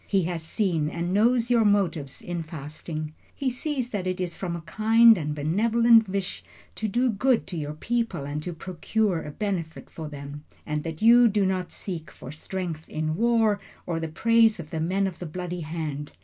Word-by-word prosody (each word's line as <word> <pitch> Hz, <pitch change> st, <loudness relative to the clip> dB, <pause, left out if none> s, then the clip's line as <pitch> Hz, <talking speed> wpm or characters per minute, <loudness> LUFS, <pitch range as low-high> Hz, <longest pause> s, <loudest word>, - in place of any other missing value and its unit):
He 195 Hz, -3 st, +2 dB
has 170 Hz, -1 st, -2 dB
seen 160 Hz, -3 st, 0 dB
and 170 Hz, +2 st, -3 dB
knows 235 Hz, +3 st, +3 dB
your 235 Hz, -2 st, +5 dB
motives 185 Hz, -9 st, 0 dB
in 175 Hz, -1 st, -3 dB
fasting. 155 Hz, 0 st, -6 dB, 0.2 s
He 265 Hz, -2 st, -1 dB
sees 255 Hz, -1 st, -3 dB
that 190 Hz, -3 st, -2 dB
it 185 Hz, 0 st, -2 dB
is 180 Hz, -2 st, -2 dB
from 175 Hz, -3 st, -3 dB
a 170 Hz, -, -6 dB
kind 225 Hz, +7 st, +5 dB
and 150 Hz, -5 st, -3 dB
benevolent 225 Hz, +8 st, +4 dB
wish 195 Hz, -1 st, -3 dB, 0.3 s
to 220 Hz, -, -3 dB
do 240 Hz, +4 st, +2 dB
good 245 Hz, +4 st, +2 dB
to 185 Hz, -, -6 dB
your 150 Hz, -2 st, -4 dB
people 230 Hz, -5 st, -2 dB
and 145 Hz, +1 st, -3 dB
to 175 Hz, -, -4 dB
procure 185 Hz, +2 st, -1 dB
a -, -, -7 dB
benefit 170 Hz, -1 st, -4 dB
for 160 Hz, -2 st, -6 dB
them; 145 Hz, 0 st, -8 dB, 0.2 s
and 150 Hz, 0 st, -2 dB
that 165 Hz, +3 st, -5 dB
you 240 Hz, +1 st, +8 dB
do 205 Hz, -2 st, +2 dB
not 185 Hz, -1 st, -1 dB
seek 165 Hz, -6 st, -6 dB
for 130 Hz, -, -10 dB
strength 165 Hz, 0 st, -5 dB
in 155 Hz, 0 st, -2 dB
war, 225 Hz, -1 st, +3 dB, 0.3 s
or 165 Hz, -2 st, -2 dB
the 165 Hz, -, -3 dB
praise 225 Hz, +6 st, +3 dB
of 155 Hz, -2 st, -8 dB
the 160 Hz, -, -2 dB
men 190 Hz, +4 st, +1 dB
of 185 Hz, -3 st, -4 dB
the 175 Hz, -, -5 dB
bloody 180 Hz, +2 st, -5 dB
hand. 155 Hz, -2 st, -4 dB
180 Hz, 195 wpm, -26 LUFS, 155-220 Hz, 0.3 s, you